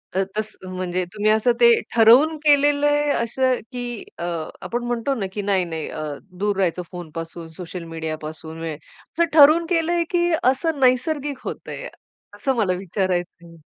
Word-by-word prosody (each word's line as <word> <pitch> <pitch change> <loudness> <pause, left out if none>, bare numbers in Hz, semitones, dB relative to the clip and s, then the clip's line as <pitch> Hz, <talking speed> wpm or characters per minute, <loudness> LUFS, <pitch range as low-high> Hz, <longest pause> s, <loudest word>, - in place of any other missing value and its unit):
अ, 195 - +2
तसं 215 -3 -5
म्हणजे 185 0 -2
तुम्ही 215 0 +2
असं 220 +3 +3
ते 235 - +7 0.3
ठरवून 245 +8 +6
केलेलंय 290 0 +4
असं, 255 +2 +1 0.2
की 245 -2 -5 0.2
अ, 170 - -3 0.4
आपण 240 +1 -3
म्हणतो 240 +3 -1
ना, 205 -6 -2
की 205 - -3
नाही, 195 -2 +1
नाही, 160 -2 -5
अ, 155 - -6 0.4
दूर 205 0 +1
राहायचं 180 -2 0
फोनपासून, 165 -1 -7
सोशल 180 0 -7
मीडियापासून, 160 0 -6
म्हणजे 165 -1 -4
असं 335 - -4
ठरवून 310 +2 +7
केलंय, 340 0 +1
की 345 0 +1
असं 285 +4 +1
नैसर्गिक 275 +2 +1
होतंय? - - -6 0.5
असं 260 +6 -1
मला 205 -6 +1
विचारायचंय. 180 -2 -3
220 Hz, 150 wpm, -22 LUFS, 180-285 Hz, 0.5 s, ते